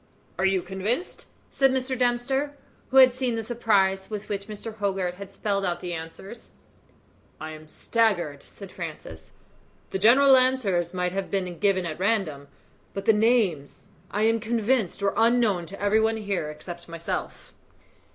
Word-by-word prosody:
"Are 190 - +2
you 190 -2 +1
convinced?" 205 - -3 0.2
said 270 -1 +3
Mr. 260 0 -1
Dempster, 260 +4 0 0.3
who 265 - +1
had 260 -1 +8
seen 255 -2 -1
the 225 - -3
surprise 200 -5 +1
with 210 -1 -6
which 200 -1 -4
Mr. 215 +1 -7
Hogarth 195 -3 -1
had 200 0 -9
spelled 200 0 -1
out 175 -2 -1
the 175 -1 -5
answers. 165 +7 -9 0.9
"I 155 - -6
am 155 0 -11
staggered," 175 -7 0
said 195 -2 -12
Francis. - - -8 0.6
"The 190 - -2
general 265 +6 +7
answers 235 -10 +2
might 180 -1 -1
have 195 +1 -3
been 185 -3 -2
given 195 -3 +2
at 160 -1 -5
random, 185 -9 0 0.5
but 195 0 -4
the 220 - +6
names, 210 - +1 0.2
I 210 - -1
am 225 +1 +3
convinced, 225 -3 0
were 200 - +2
unknown 225 -6 +2
to 195 +3 -9
every 205 +2 +3
one 225 0 +1
here 200 -7 -2
except 170 +3 -9
myself." 165 0 -5
200 Hz, 160 wpm, -26 LUFS, 180-235 Hz, 0.9 s, had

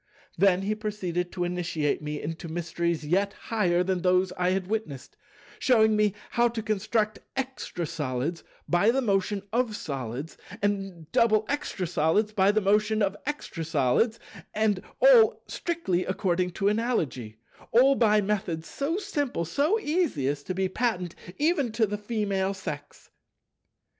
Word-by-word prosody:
Then 190 0 +3
he 210 +2 0
proceeded 190 -5 -3
to 180 - -2
initiate 170 -5 -1
me 150 0 -4
into 165 +2 -5
mysteries 170 -1 -2
yet 195 +5 +1
higher 180 -6 0
than 185 -1 -1
those 185 0 +3
I 180 -1 0
had 185 0 0
witnessed, 200 -10 -4 0.4
shewing 220 -4 +4
me 210 -1 +2 0.2
how 240 0 +3
to 230 -2 -4
construct 215 +1 0 0.2
Extra 260 -9 -3
Solids 150 +2 -3 0.2
by 175 +5 +3
the 265 +3 +2
motion 200 -1 0
of 235 -2 +1
Solids, 135 - -5 0.2
and 195 -6 -2
Double 225 -3 +3
Extra 285 -10 -2
Solids 175 +6 +1
by 195 -1 +4
the 215 +1 +1
motion 210 +2 +2
of 200 0 0
Extra 290 - -4
Solids, 160 - +1 0.4
and 210 -3 +1 0.2
all - - +7
"strictly 330 - -1
according 185 -2 0
to 195 - 0
Analogy," 165 - -1 0.3
all 260 +4 +6
by 215 -5 +4
methods 195 -6 -2
so 290 - -2
simple, 290 - -2
so 295 - +1
easy, 305 - 0
as 140 0 -1
to 185 - -3
be 190 0 +1
patent 185 -4 -1 0.2
even 295 -5 +1
to 225 0 +3
the 210 0 -4
Female 200 -3 -1
Sex. 150 -6 -8
195 Hz, 150 wpm, -27 LUFS, 170-220 Hz, 0.4 s, all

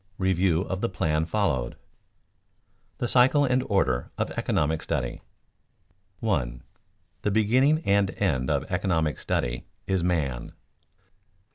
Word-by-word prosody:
REVIEW 95 -2 +2
OF 95 -1 -4
THE 115 - 0
PLAN 80 -3 0
FOLLOWED 80 - 0
[Sidenote: - - -24 1.2
The 120 - -1
cycle 130 +4 +5
and 130 -1 +2
order 65 - +1
of - - -1
economic 80 +2 0
study] 60 -6 -3 1.0
1. 65 - -1 0.6
_The 105 - 0
beginning 130 +9 +3
and 100 -1 +3
end 65 0 0
of 70 -3 +1
economic 80 -6 0
study - - -2 0.2
is 95 -3 0
man. 75 -9 -1
90 Hz, 120 wpm, -26 LUFS, 70-105 Hz, 1.2 s, cycle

